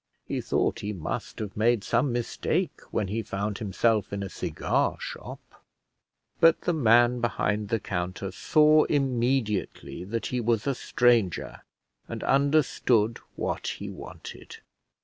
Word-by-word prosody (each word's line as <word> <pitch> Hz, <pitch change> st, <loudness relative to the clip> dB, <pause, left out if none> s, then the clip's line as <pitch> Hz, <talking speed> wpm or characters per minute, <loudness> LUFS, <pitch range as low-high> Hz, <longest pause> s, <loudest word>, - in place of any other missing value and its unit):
He -, -, -3 dB
thought -, -, 0 dB
he 105 Hz, +1 st, -4 dB
must 85 Hz, -6 st, -5 dB
have 105 Hz, -3 st, -5 dB
made 115 Hz, 0 st, +2 dB
some 120 Hz, +3 st, +1 dB
mistake 120 Hz, -1 st, -1 dB
when 105 Hz, -, -1 dB
he 110 Hz, +4 st, -2 dB
found 100 Hz, -1 st, -3 dB
himself 110 Hz, +1 st, +1 dB
in 100 Hz, 0 st, -3 dB
a 95 Hz, -, -5 dB
cigar -, -, -1 dB
shop, -, -, -9 dB, 0.8 s
but 165 Hz, -1 st, +5 dB
the 175 Hz, -, 0 dB
man 120 Hz, -3 st, +4 dB
behind 105 Hz, -3 st, -1 dB
the 115 Hz, -, +1 dB
counter 95 Hz, +1 st, -4 dB
saw 155 Hz, 0 st, +4 dB
immediately 125 Hz, -, -1 dB
that 115 Hz, +4 st, -3 dB
he 125 Hz, -, 0 dB
was 115 Hz, -1 st, +1 dB
a 140 Hz, -, +1 dB
stranger, 120 Hz, -7 st, +1 dB, 0.5 s
and -, -, -6 dB
understood 135 Hz, -5 st, +2 dB, 0.2 s
what -, -, -3 dB
he -, -, -6 dB
wanted. -, -, -10 dB
115 Hz, 135 wpm, -27 LUFS, 105-125 Hz, 0.8 s, but